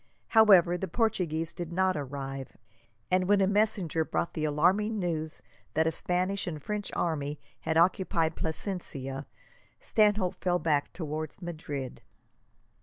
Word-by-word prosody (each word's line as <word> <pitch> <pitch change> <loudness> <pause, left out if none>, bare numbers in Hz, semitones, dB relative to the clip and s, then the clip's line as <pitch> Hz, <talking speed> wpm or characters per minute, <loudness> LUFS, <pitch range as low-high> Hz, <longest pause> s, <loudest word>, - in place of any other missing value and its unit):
However, 190 -6 +6
the 190 - -2
Portuguese 170 -6 0
did 175 -1 -6
not 185 +1 +2
arrive; 135 -2 -5 0.5
and 185 0 +3
when 205 0 +5
a 195 - +4
messenger 200 -5 +1
brought 170 - -2
the 155 -2 -1
alarming 185 +9 +2
news 160 -4 -3 0.3
that 160 +1 +3
a 160 - +2
Spanish 180 +4 -1
and 155 -3 -3
French 210 +6 -4
army 150 -3 -1 0.2
had 160 - -1
occupied 170 -1 +2
Plasencia, 145 -6 -4 0.5
Stanhope 210 -4 +2
fell 180 -1 +3
back 150 -5 +1
towards 155 -2 -5
Madrid. 150 -7 -5
170 Hz, 130 wpm, -29 LUFS, 155-190 Hz, 0.5 s, However